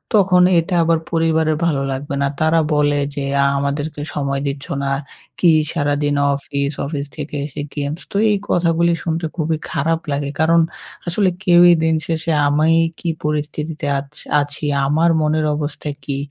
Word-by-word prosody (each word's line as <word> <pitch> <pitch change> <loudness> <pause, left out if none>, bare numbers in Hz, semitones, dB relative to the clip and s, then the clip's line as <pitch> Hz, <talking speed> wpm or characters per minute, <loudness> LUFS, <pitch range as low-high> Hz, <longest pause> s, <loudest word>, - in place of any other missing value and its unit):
তখন 185 -3 +5 0.2
এটা 170 +2 -2
আবার 165 0 +2
পরিবারের 160 -1 +2
ভালো 150 -5 +1
লাগবে 140 +1 -4
না। 140 - +2
তারা 160 +1 +3 0.2
বলে 145 0 +2 0.2
যে, 140 - -3 0.2
"আ - - +3
আমাদেরকে 145 +2 -3
সময় 140 -1 -1
দিচ্ছো 140 0 -5
না, 135 - -1 0.5
কি 175 - +5 0.2
সারাদিন 145 -2 0 0.2
অফিস, 140 0 -3
অফিস 140 -1 -3
থেকে 150 0 -6
এসে 145 -1 -6
games" 145 +3 -3
তো - - -10 0.2
এই 205 - +2
কথাগুলি 170 0 +2
শুনতে 165 0 -2
খুবই 160 -1 0
খারাপ 160 +3 0
লাগে 140 0 -1
কারণ 165 +1 +4 0.5
আসলে 185 +3 +2
কেউই 175 0 +7
দিন 160 0 +2
শেষে 165 0 -1 0.2
আমি 160 +3 +3 0.2
কি 170 - -3 0.2
পরিস্থিতিতে 150 +1 -3
আছ 140 0 -9 0.3
আছি, 145 +1 -5 0.2
আমার 160 +4 +3
মনের 155 0 +1
অবস্থা 150 0 -4
কী, 140 -1 -3
155 Hz, 160 wpm, -19 LUFS, 145-165 Hz, 0.5 s, কেউই